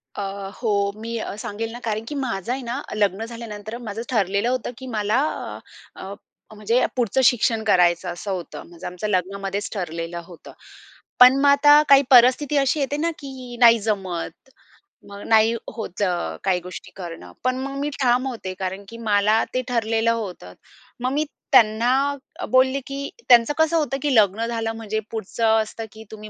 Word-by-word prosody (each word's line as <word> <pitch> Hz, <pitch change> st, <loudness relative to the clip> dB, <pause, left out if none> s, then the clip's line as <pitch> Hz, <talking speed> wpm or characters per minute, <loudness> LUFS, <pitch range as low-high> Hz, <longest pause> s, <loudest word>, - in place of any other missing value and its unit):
अ, 195 Hz, 0 st, -5 dB
हो, 200 Hz, -4 st, +1 dB
मी 230 Hz, 0 st, -4 dB, 0.2 s
सांगेल 225 Hz, 0 st, -5 dB
ना 240 Hz, -, -8 dB
कारण 220 Hz, -1 st, -2 dB
की 295 Hz, -, -5 dB
माझं 235 Hz, -5 st, -3 dB
आहे 265 Hz, -, -2 dB
ना, 245 Hz, +4 st, -4 dB
लग्न 205 Hz, +1 st, 0 dB
झाल्यानंतर 230 Hz, -1 st, -7 dB
माझं 225 Hz, -2 st, -6 dB
ठरलेलं 200 Hz, 0 st, +1 dB
होतं 250 Hz, -1 st, -2 dB
की 260 Hz, -1 st, -9 dB
मला 215 Hz, +1 st, 0 dB, 0.8 s
अ, -, -, -10 dB
अ, 195 Hz, +1 st, -7 dB, 0.4 s
म्हणजे 225 Hz, +4 st, +1 dB
पुढचं 245 Hz, +1 st, +1 dB
शिक्षण 225 Hz, -2 st, +3 dB
करायचं 180 Hz, -3 st, +3 dB
असं 185 Hz, +3 st, -6 dB
होतं. 180 Hz, -3 st, -6 dB
म्हणजे 170 Hz, +1 st, -12 dB
आमचं 180 Hz, +4 st, -5 dB
लग्नामध्येच 195 Hz, +1 st, -2 dB
ठरलेलं 170 Hz, -2 st, -4 dB
होतं. 175 Hz, -2 st, -13 dB, 0.7 s
पण 250 Hz, +1 st, +9 dB
मग 285 Hz, -, +5 dB
आता 290 Hz, +1 st, +7 dB
काही 275 Hz, 0 st, +8 dB
परिस्थिती 255 Hz, +4 st, +5 dB
अशी 275 Hz, +2 st, +2 dB
येते 280 Hz, +1 st, -1 dB
ना, 330 Hz, +3 st, 0 dB
की 260 Hz, -4 st, -9 dB
नाही 230 Hz, -1 st, +7 dB
जमत. 190 Hz, -1 st, -4 dB, 0.6 s
मग 200 Hz, 0 st, -9 dB
नाही 220 Hz, 0 st, +4 dB, 0.2 s
होतं 205 Hz, -3 st, -3 dB, 0.3 s
अ, 80 Hz, -, -10 dB
काही 180 Hz, -2 st, +1 dB
गोष्टी 180 Hz, +1 st, -9 dB
करणं. 165 Hz, -, -8 dB
पण 255 Hz, 0 st, 0 dB
मग 275 Hz, 0 st, -5 dB
मी 290 Hz, -, -1 dB
ठाम 250 Hz, +1 st, +2 dB
होते 220 Hz, -7 st, -5 dB
कारण 190 Hz, +1 st, -4 dB
की 230 Hz, -, -10 dB
मला 210 Hz, +2 st, +3 dB
ते 255 Hz, -, +1 dB
ठरलेलं 225 Hz, -1 st, +1 dB
होतं. 195 Hz, -, -5 dB, 0.5 s
मग 255 Hz, +1 st, -1 dB
मी 300 Hz, +2 st, +1 dB, 0.3 s
त्यांना 230 Hz, 0 st, +5 dB, 0.5 s
अ, -, -, -3 dB
बोलले, 260 Hz, +2 st, +3 dB
की 275 Hz, 0 st, -5 dB, 0.2 s
त्यांचं 240 Hz, +3 st, +6 dB
कसं 320 Hz, +1 st, +3 dB
होतं 280 Hz, -4 st, 0 dB
की 285 Hz, -4 st, +1 dB
लग्न 215 Hz, +1 st, +3 dB
झालं 225 Hz, -1 st, -2 dB
म्हणजे 220 Hz, -1 st, -3 dB
पुढचं 225 Hz, +1 st, 0 dB
असतं 225 Hz, +1 st, -8 dB
की 220 Hz, -, -11 dB
तुम्ही 215 Hz, 0 st, -9 dB
225 Hz, 175 wpm, -22 LUFS, 200-255 Hz, 0.8 s, पण